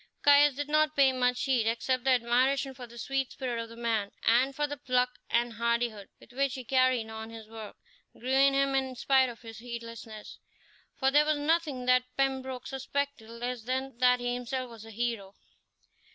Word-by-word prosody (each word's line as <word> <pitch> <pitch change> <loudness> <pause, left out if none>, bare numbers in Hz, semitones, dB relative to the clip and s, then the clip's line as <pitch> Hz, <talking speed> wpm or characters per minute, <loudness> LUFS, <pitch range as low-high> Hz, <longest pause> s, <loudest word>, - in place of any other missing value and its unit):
Caius 290 -1 +6
did 290 +1 -3
not 305 0 +2
pay 275 -2 +5
much 250 -1 0
heed, 250 -5 +1
except 250 +2 0
that 255 -3 +3
admiration 265 +3 +2
for 250 -2 -10
the 235 +1 -14
sweet 270 +2 -2
spirit 245 -4 -3
of 230 - -8
the 230 - -11
man 225 -3 -1
and 255 +4 +3
for 295 - 0
the 290 0 -4
pluck 250 -2 +1 0.2
and 235 0 +1
hardihood 235 -2 -1
with - - -18
which 275 +1 0
he 260 - -6
carried 255 -2 +2
on 220 0 -7
his 225 -1 -10
work, 220 -1 -9 0.4
grew 255 +2 -4
in 275 +1 +5
him 275 0 +2
in 265 -1 -1
spite 265 +1 +3
of 235 0 -11
his 225 -1 -9
heedlessness, 230 -2 -9 0.6
for 265 -1 +2
there 295 +2 +6
was 305 0 +1
nothing 295 -4 0
that 255 0 +4
Pembroke 265 -2 -1
suspected 270 -3 -3
less 240 +1 -5
than 260 +3 -3
that 250 0 +4
he 245 0 -2
himself 250 0 -4
was 225 -1 -11
a - - -11
hero. 225 -3 -3
250 Hz, 195 wpm, -29 LUFS, 235-270 Hz, 0.6 s, Caius